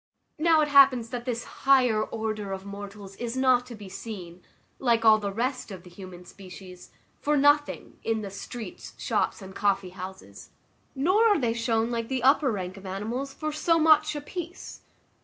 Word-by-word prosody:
Now 320 0 +4
it 300 - +2
happens 270 -5 +6
that 245 -1 -5
this 240 -2 -2
higher 250 -6 +3
order 215 -3 -4
of 190 0 -7
mortals 200 0 -9
is 240 +1 -4
not 255 -1 +3
to 240 - -8
be 205 -2 -10
seen, 185 -3 -8 0.4
like 235 -3 +2
all 215 -1 +7
the 200 -1 -3
rest 250 +5 -2
of 190 -3 -9
the 180 - -14
human 180 -1 -11
species, 185 -1 -12 0.3
for 300 0 +1
nothing, 290 +1 +2
in 220 -1 -1
the 200 - -6
streets, 215 +1 -8
shops, - - -1
and 190 0 -10
coffee 195 -2 0
houses; 190 +1 -10 0.5
nor 370 +12 +3
are 415 -3 +4
they 235 -5 0
shown, 230 0 0
like 230 -1 -2
the 260 -1 -2
upper 275 0 +4
rank 190 -2 -5
of 195 - -12
animals, 225 +8 -4
for 310 +2 -4
so 330 +2 +2
much 310 -1 +4
a 295 - -4
piece. 345 +3 -8
230 Hz, 180 wpm, -27 LUFS, 195-275 Hz, 0.5 s, all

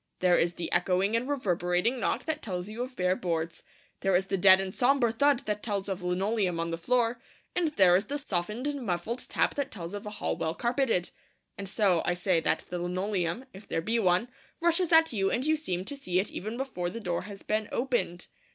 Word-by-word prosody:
There 180 -1 +4
is 170 +1 +1
the 175 - -5
echoing 185 +4 +2
and 245 +4 -1
reverberating 185 -2 0
knock - - -1
that 310 -1 -2
tells 180 -3 -4
you 220 +3 -6
of 255 +1 -5
bare 180 0 +1
boards; 165 -2 -3 0.4
there 195 -1 +2
is 185 +2 +2
the 195 - -1
dead 190 0 +7
and 190 -1 -3
sombre 250 -2 +3
thud 280 +3 +2
that 210 -1 -2
tells 200 -3 -2
of 190 -1 -3
linoleum 185 0 0
on 165 0 -1
the 165 - -2
floor; 240 +3 +1 0.3
and 355 -2 +2
there 180 -2 +6
is 195 +4 +2
the 285 - -3
softened 210 -2 -2
and 290 -1 -2
muffled 210 +5 -3
tap - - +1
that 280 -2 -2
tells 175 -3 -7
of 205 0 -6
a - - -2
hall 210 - -2
well 160 +1 -2
carpeted. 235 -7 0 0.4
And 195 -1 -6
so 195 -5 +2
I 175 - 0
say 180 -1 +2
that - - 0
the 180 - -2
linoleum 185 +4 -2
if 190 +2 -12
there - - -1
be 225 +8 0
one 185 +3 +2 0.3
rushes 340 +1 +3
at 325 -3 +6
you, 195 -3 +1
and 245 +6 -1
you 310 +1 +3
seem 185 - -3
to 285 - -4
see 185 -10 -1
it 195 - -2
even 215 +5 -5
before 250 -10 -3
the 230 - -6
door 175 -6 -2
has 200 -1 -10
been 215 0 -1
opened. 235 -9 -1
200 Hz, 225 wpm, -29 LUFS, 180-245 Hz, 0.4 s, dead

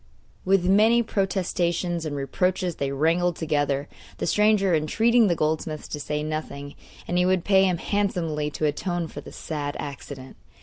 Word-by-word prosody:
With 190 -1 +3
many 220 +5 +5
protestations 175 -4 -1
and 145 - -4
reproaches 180 +5 -1
they 140 -1 -2
wrangled 165 +5 +1
together, 145 -3 -1 0.3
the - - -2
stranger 210 -1 +3
entreating 225 +9 +3
the 175 - +2
goldsmith 155 0 -2
to 150 - -4
say 150 +1 -3
nothing 150 -2 -5 0.3
and 180 - 0
he 180 - +3
would 185 -2 +1
pay 195 -1 +5
him 180 -2 +1
handsomely 170 -7 -1
to 155 - -3
atone 170 +3 -1
for - - -8
the - - -11
sad 145 -2 -4
accident. 135 -1 -8
170 Hz, 160 wpm, -25 LUFS, 150-190 Hz, 0.3 s, many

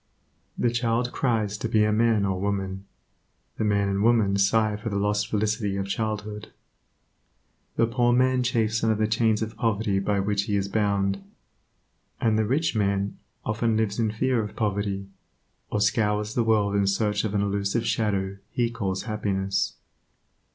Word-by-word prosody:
The 120 - +1
child 120 +1 0
cries 110 -5 0
to 115 - -2
be 110 -2 +3
a 105 - +2
man 110 -1 +3
or 95 -1 -1
woman; 95 -1 -2 0.7
the - - -1
man 100 -1 +2
and 100 0 0
woman 110 -3 +3
sigh 105 +2 +2
for 110 +2 -5
the 100 - -3
lost 105 +1 +1
felicity 105 -2 -1
of 95 - -2
childhood. 105 0 -4 1.2
The 115 - +3
poor 120 +1 +2
man 130 +1 +3
chafes 115 -3 0
under 110 -1 +3
the 110 +1 +1
chains 110 0 +2
of 110 +1 -6
poverty 105 -3 0
by 100 0 0
which 100 0 0
he 105 - -1
is 100 -1 0
bound, 100 -2 0 1.0
and 110 -2 +2
the 110 0 +2
rich 140 +5 0
man 100 -1 0 0.3
often 110 +1 0
lives 110 -1 -1
in 110 -2 +2
fear 115 +3 +1
of 105 - -7
poverty, 100 -2 -1 0.6
or 105 - -1
scours 105 0 +1
the 120 - +1
world 105 -3 +2
in 100 -1 +2
search 105 +1 +1
of 105 -2 -2
an 100 - +2
elusive 100 +2 -1
shadow 100 -3 0
he 120 -1 0
calls 95 -5 -2
happiness. 100 -3 -1
105 Hz, 165 wpm, -25 LUFS, 100-115 Hz, 1.2 s, be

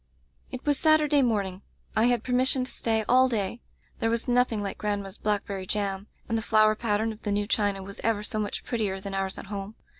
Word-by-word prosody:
"It 255 0 -7
was 290 -2 +2
Saturday 305 -2 +4
morning. 200 -6 0 0.3
I 220 - +4
had 245 -2 +2
permis 255 +1 +2
sion 260 -2 +1
to 255 - -3
stay 220 -1 0
all 255 +1 +5
day. 225 0 -2 0.4
There 225 - +1
was 230 +2 -1
nothing 245 -4 +2
like 195 - -4
grandma's 205 -1 -3
blackberry 200 -2 -2
jam, 200 -1 -2 0.2
and 230 - -1
the 225 - 0
flower 215 -1 +4
pattern 220 0 0
of 220 - -11
the 205 - -2
new 205 0 +1
china 205 -2 0
was 200 +1 -8
ever 220 -2 +1
so 215 0 -2
much 210 -1 -3
prettier 210 -5 -2
than 195 0 -6
ours 195 0 -2
at - - -7
home. 200 +1 -6
215 Hz, 215 wpm, -27 LUFS, 200-240 Hz, 0.4 s, all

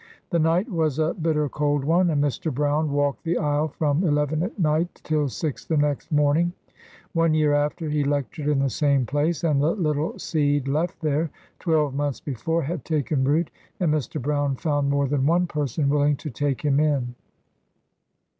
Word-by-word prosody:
The 170 - +2
night 165 +7 +2
was 160 - 0
a 160 +1 +1
bitter 155 -4 0
cold 145 0 0
one, 175 +3 +3
and 145 -3 +1
Mr. 145 +2 -1
Brown 145 +2 0
walked 145 -1 0
the 170 0 0
aisle 150 0 +1
from 150 +2 0
eleven 150 -1 +1
at 185 +6 -3
night 160 0 0
till 150 -2 0
six 150 +2 -4
the 160 - -1
next 145 +2 0
morning. 150 +4 +2 0.6
One 165 -2 +2
y 155 0 +2
after, 150 +2 +1
he 150 -1 0
lectured 145 +1 -2
in 150 -1 +2
the 135 0 +1
same 140 -2 +2
place, 145 +5 -1
and 150 -4 +2
the 155 +6 +2
little 155 -4 -1
seed 145 -3 0
left 155 +5 -1
there, 155 +1 0 0.3
twelve 155 -5 +1
months 145 -1 -2
before, 155 +5 -2
had 155 -1 -4
taken 150 -3 0
root, 150 +5 +1 0.3
and 170 -5 +2
Mr. 150 0 -2
Brown 145 0 0
found 145 0 0
more 140 0 +1
than 140 0 +1
one 175 +2 +3
person 150 -3 -1
willing 145 +1 +3
to 150 +1 -7
take 140 +2 -1
him 140 -1 +3
in. 140 -5 +1
150 Hz, 185 wpm, -24 LUFS, 145-160 Hz, 0.6 s, one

